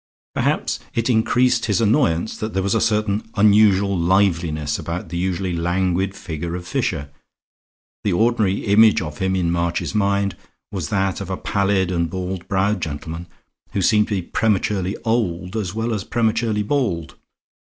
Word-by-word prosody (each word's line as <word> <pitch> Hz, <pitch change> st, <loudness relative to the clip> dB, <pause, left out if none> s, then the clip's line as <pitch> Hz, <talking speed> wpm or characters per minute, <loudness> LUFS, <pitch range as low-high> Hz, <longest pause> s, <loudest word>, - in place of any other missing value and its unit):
Perhaps -, -, 0 dB, 0.2 s
it 115 Hz, +2 st, +1 dB
increased 125 Hz, +2 st, +2 dB
his 105 Hz, -1 st, +2 dB
annoyance 110 Hz, -, +2 dB
that 110 Hz, -1 st, -5 dB
there 95 Hz, -, +1 dB
was 100 Hz, -, +1 dB
a -, -, +2 dB
certain 105 Hz, -1 st, 0 dB
unusual 100 Hz, -2 st, +4 dB
liveliness 85 Hz, -5 st, +1 dB
about 85 Hz, +1 st, -5 dB
the 85 Hz, -, -4 dB
usually 90 Hz, 0 st, -1 dB
languid 90 Hz, +2 st, 0 dB
figure 85 Hz, +1 st, -5 dB
of 90 Hz, 0 st, -7 dB
Fisher. 70 Hz, -4 st, -2 dB, 0.9 s
The 100 Hz, -, +1 dB
ordinary 110 Hz, -1 st, +1 dB
image 105 Hz, +1 st, +5 dB
of 75 Hz, -2 st, -7 dB
him 95 Hz, 0 st, 0 dB
in 85 Hz, -2 st, +1 dB
March's 85 Hz, +2 st, -1 dB
mind 100 Hz, -2 st, +1 dB, 0.4 s
was 90 Hz, -8 st, -4 dB
that 95 Hz, -1 st, 0 dB
of 100 Hz, -, -6 dB
a 95 Hz, -, -2 dB
pallid 95 Hz, -2 st, 0 dB
and 85 Hz, -2 st, 0 dB
bald 95 Hz, 0 st, -4 dB
browed 100 Hz, 0 st, +1 dB
gentleman, 80 Hz, +2 st, -5 dB, 0.5 s
who 100 Hz, -, 0 dB
seemed 105 Hz, +2 st, +4 dB
to 105 Hz, -, -1 dB
be 95 Hz, -, -2 dB
prematurely 100 Hz, -2 st, 0 dB
old 95 Hz, -5 st, -1 dB
as 105 Hz, -4 st, -3 dB
well 115 Hz, +1 st, -1 dB
as 105 Hz, -3 st, -2 dB
prematurely 110 Hz, -1 st, 0 dB
bald. 100 Hz, -, -1 dB
95 Hz, 160 wpm, -21 LUFS, 85-105 Hz, 0.9 s, image